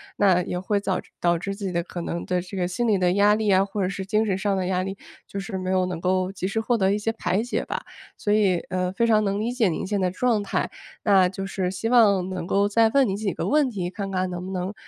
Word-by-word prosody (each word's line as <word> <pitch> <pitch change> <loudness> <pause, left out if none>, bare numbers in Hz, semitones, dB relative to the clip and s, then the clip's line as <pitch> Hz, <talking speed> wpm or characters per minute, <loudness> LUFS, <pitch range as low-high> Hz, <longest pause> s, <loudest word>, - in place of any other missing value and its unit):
那 190 -3 +4
也 180 - -3
会 200 +3 0
早 190 -2 -1 0.2
导 175 -1 +2
致 195 +3 -4
自 200 0 -6
己 180 - -3
的 170 - 0
可 175 - -7
能 170 0 -4
对 180 0 0
这 185 +3 -9
个 180 -2 0
心 235 +6 -1
理 210 - +3
的 180 -1 +2
压 205 +2 +4
力 215 -2 +1
啊， 190 +1 +4
或 200 0 -3
者 185 - 0
是 195 -1 -5
精 215 +3 +1
神 190 -3 0
上 200 0 0
的 185 -1 -1
压 185 -1 0
力， 195 +1 -5 0.3
就 200 - -7
是 195 -1 -5
没 185 0 -4
有 185 -1 +2
能 180 -2 -4
够 185 +1 0
及 185 -1 -3
时 220 +3 -1
获 235 +2 +1
得 195 -1 +2
一 - - +1
些 210 +2 -1
排 210 -1 -1
解 245 - -2
吧。 - - -4 0.3
所 205 - -1
以， 195 -5 +3
呃， 185 -1 -1
非 235 - +1
常 220 -2 +4
能 200 0 0
理 235 +3 -1
解 240 -5 +2
您 170 - -2
现 205 +1 -1
在 185 -1 +1
状 225 +3 +1
态， 200 - -2 0.3
那 195 -3 +5
就 195 +1 -5
是 190 -2 -2
希 210 +4 -3
望 200 -6 +4
能 185 -2 -4
够 200 +1 +2
再 225 +2 +4
问 275 +3 +4
您 195 -3 -1
几 205 -3 -2
个 - - -3
问 295 -2 +3
题 185 -6 -3
看 195 +1 -5
看 185 -1 -1
能 180 0 -5
不 - - -6
能， 185 +2 -3
195 Hz, 305 characters per minute, -24 LUFS, 185-210 Hz, 0.3 s, 那